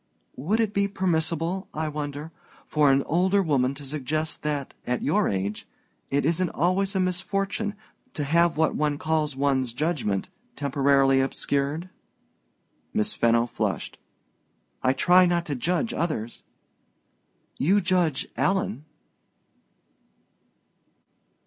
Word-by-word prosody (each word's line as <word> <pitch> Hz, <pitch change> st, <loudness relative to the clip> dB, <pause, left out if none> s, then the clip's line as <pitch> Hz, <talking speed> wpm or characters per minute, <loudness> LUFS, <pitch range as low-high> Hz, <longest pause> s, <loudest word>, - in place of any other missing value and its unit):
"Would 185 Hz, -, 0 dB
it 220 Hz, -2 st, +1 dB
be 200 Hz, 0 st, +2 dB
permissible, 175 Hz, -1 st, -1 dB
I 155 Hz, +1 st, -1 dB
wonder, 150 Hz, +1 st, -5 dB, 0.3 s
for 150 Hz, -2 st, +3 dB
an 135 Hz, 0 st, +3 dB
older 185 Hz, +4 st, +2 dB
woman 140 Hz, -5 st, +1 dB
to 140 Hz, 0 st, -8 dB
suggest 155 Hz, +2 st, -3 dB
that, 145 Hz, -3 st, -3 dB
at 125 Hz, 0 st, -1 dB
your 200 Hz, +8 st, +2 dB
age, 100 Hz, +2 st, -3 dB, 0.4 s
it 140 Hz, +1 st, +1 dB
isn't 170 Hz, +3 st, +1 dB
always 190 Hz, +5 st, 0 dB
a -, -, +2 dB
misfortune 195 Hz, +3 st, -1 dB, 0.4 s
to 150 Hz, -, -2 dB
have 170 Hz, +3 st, +2 dB
what 160 Hz, 0 st, +2 dB
one 150 Hz, -1 st, 0 dB
calls 155 Hz, -2 st, 0 dB
one's 135 Hz, -3 st, +1 dB
judgment 125 Hz, -, -1 dB, 0.3 s
temporarily 135 Hz, -1 st, +3 dB
obscured?" 140 Hz, +5 st, -1 dB, 1.0 s
Miss 105 Hz, -, +1 dB
Fenno 115 Hz, 0 st, +3 dB
flushed. 120 Hz, -, -3 dB, 0.8 s
"I 130 Hz, -, +3 dB
try 180 Hz, +6 st, +5 dB
not 175 Hz, -1 st, +1 dB
to 150 Hz, -, -3 dB
judge 180 Hz, -, -1 dB
others 135 Hz, -9 st, -3 dB, 0.6 s
" -, -, -38 dB
"You 200 Hz, +3 st, +5 dB
judge 175 Hz, -6 st, +1 dB
Alan." 180 Hz, -, 0 dB
155 Hz, 120 wpm, -25 LUFS, 140-180 Hz, 1.0 s, try